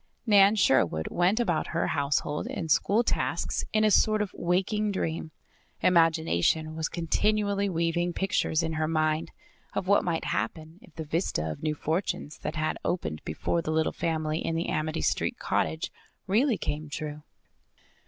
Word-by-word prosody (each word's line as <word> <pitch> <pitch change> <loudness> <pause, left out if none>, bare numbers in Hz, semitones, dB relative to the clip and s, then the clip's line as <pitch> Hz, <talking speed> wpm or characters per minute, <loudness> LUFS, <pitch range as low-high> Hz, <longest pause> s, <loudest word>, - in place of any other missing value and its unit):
Nan 205 -2 +6
Sherwood 85 - +2
went 180 +6 +2
about 175 -10 0
her - - +2
household 145 0 -1
and 160 -3 -4
school 215 +4 +3
tasks - - -1
in 215 0 +2
a 215 - +4
sort 215 +1 +4
of 205 - -6
waking 195 +4 0
dream. 165 -4 -3 0.5
Imagination 160 - +2
was 160 0 -2
continually 200 +4 0
weaving 170 0 0
pictures 175 -3 0
in 160 0 -2
her 155 0 0
mind 155 +1 0 0.5
of 185 - -2
what 200 +1 +4
might 170 -2 -1
happen 160 - -3
if 165 - -19
the 160 -1 -5
vista 145 - -1
of - - -8
new 155 -1 -1
fortunes 155 -1 -2
that 150 - -4
had 155 0 -1
opened 80 - -2
before 80 - -1
the 160 - -5
little 160 0 +1
family 155 -1 -1
in 165 - -2
the 165 - -1
Amity 155 +1 -1
Street - - 0
cottage 80 0 -1 0.3
really 225 +4 +2
came 155 -1 -4
true. 150 0 -5
165 Hz, 160 wpm, -28 LUFS, 155-190 Hz, 0.5 s, Nan